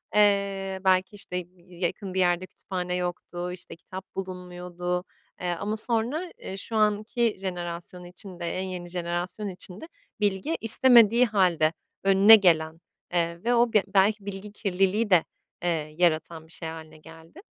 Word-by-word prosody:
Eee, 200 -2 +2
belki, 185 +2 +3
işte, 195 -2 -7
y 180 - -5
y 175 0 -17
yakın 185 +1 -3
bir 190 - -1
yerde 175 0 +2
kütüphane 180 -2 -4
yoktu, 180 0 -4
işte, 180 - -7
kitap 185 +2 -11
bulunmuyordu. 180 -1 -4 0.4
Eee, 180 -1 -1
ama 210 +2 -2
sonra, 245 +11 0
eee, 190 - -6
şu 225 - -6
anki 215 +2 +1
jenerasyon 175 -1 -5
içinde, 180 0 -7
en - - -2
yeni 180 -2 -6
jenerasyon 175 +4 -3
içinde 185 - -1 0.3
bilgi 205 - 0
istemediği 235 0 +6
hâlde 180 -7 +2 0.3
önüne 195 +3 +8
gelen, 165 -5 +2 0.3
eee, 170 0 -1
ve 240 +1 +2
o 235 -1 +3
bi 210 - +5
belki 200 +1 +2
bilgi 200 +1 -7
kirliliği 200 +2 0
de, 180 -4 +5 0.4
eee, 155 -3 -2
yaratan 165 -1 0
bir - - -21
şey 165 - -6
hâline 160 -1 -10
geldi. 165 - -15
185 Hz, 150 wpm, -26 LUFS, 175-205 Hz, 0.4 s, önüne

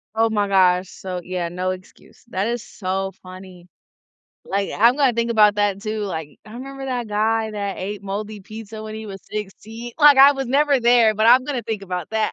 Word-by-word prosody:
Oh 225 +1 +3
my 205 -2 0
gosh. 185 -2 +3
So, 185 -2 -6
yeah, 180 -1 -3
no 185 +1 -2
excuse. 185 0 -12
That 195 -3 -2
is 240 0 -2
so 195 -1 -4
funny. 185 -1 -12 0.8
Like, 195 0 -2
I'm 235 +5 +5
gonna 275 -4 +3
think 235 0 -1
about 210 -2 +5
that 205 -1 0
too. 215 0 -3
Like, 160 -7 -6
"I 215 - -12
remember 270 +2 -7
that 245 -2 -3
guy 220 +1 0
that 200 -2 -4
ate 200 +1 -5
moldy 205 +2 -5
pizza 215 +2 -9
when 215 0 -7
he 220 - -7
was 195 -1 -8
16." 215 +3 -7
Like, 295 -2 +7
I 275 +1 +8
was 270 -1 -4
never 280 +1 +2
there, 235 -2 +4
but 215 +1 +2
I'm 255 +2 +6
gonna 275 -5 -3
think 220 -2 -4
about 180 -3 -5
that. 220 -1 0
215 Hz, 205 wpm, -21 LUFS, 195-235 Hz, 0.8 s, I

